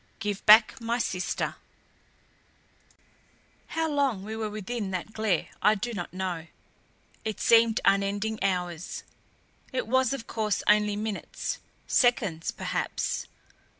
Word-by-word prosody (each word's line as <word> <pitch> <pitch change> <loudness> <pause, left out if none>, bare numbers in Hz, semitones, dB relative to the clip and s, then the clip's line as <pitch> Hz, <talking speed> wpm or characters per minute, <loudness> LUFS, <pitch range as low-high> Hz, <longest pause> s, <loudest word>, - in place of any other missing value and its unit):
GIVE 205 -2 -3
BACK 215 +2 +7
MY 230 +1 0
SISTER" 190 -6 -2 2.1
How 325 0 -1
long 280 -9 0
we 220 +2 -5
were 220 -1 -2
within 215 0 -4
that 190 +3 -4
glare 215 -7 0
I 210 - +5
do 235 +4 -3
not 175 -5 -5
know; 180 -3 -4 0.8
it 215 -1 -3
seemed 230 -1 +5
unending 200 +2 +1
hours; 180 -3 -2 0.7
it 260 - -1
was 260 +1 +2
of 275 -4 -3
course 215 -2 -1
only 210 0 +4
minutes 210 0 -4 0.3
seconds, 200 -10 +2
perhaps. - - -2
215 Hz, 115 wpm, -28 LUFS, 195-230 Hz, 2.1 s, BACK